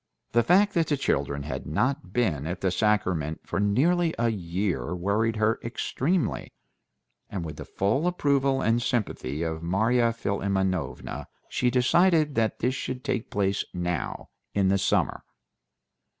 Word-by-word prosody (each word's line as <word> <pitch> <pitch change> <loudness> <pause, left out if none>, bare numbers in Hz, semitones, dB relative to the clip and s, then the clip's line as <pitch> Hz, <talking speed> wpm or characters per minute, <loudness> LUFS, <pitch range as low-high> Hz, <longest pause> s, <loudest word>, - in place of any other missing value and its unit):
The 120 - +4
fact 195 - +4
that 165 -3 +2
the 145 - +1
children 70 - -1
had 75 - -5
not 130 - -1
been 85 - 0
at 90 +2 -4
the 95 - +1
sacrament 90 -7 0
for 90 - -2
nearly 160 - +2
a 120 0 +2
year 90 - -2
worried 105 +5 0
her 110 +1 +1
extremely, 140 +8 -1 0.8
and 95 -5 -4
with 75 -2 -7
the - - -7
full 120 - 0
approval 140 -6 +1
and 115 +2 +2
sympathy 90 - -2
of 80 -1 -3
Marya 115 +7 +2
Philimonovna 100 -4 -2 0.2
she 125 - +1
decided 155 +5 +3
that 110 -3 +1
this 125 +2 +1
should 130 -1 -4
take 115 - -2
place 100 -1 0
now 90 -2 -3 0.3
in 100 -2 +3
the 100 0 +3
summer. - - +1
105 Hz, 145 wpm, -26 LUFS, 90-130 Hz, 0.8 s, The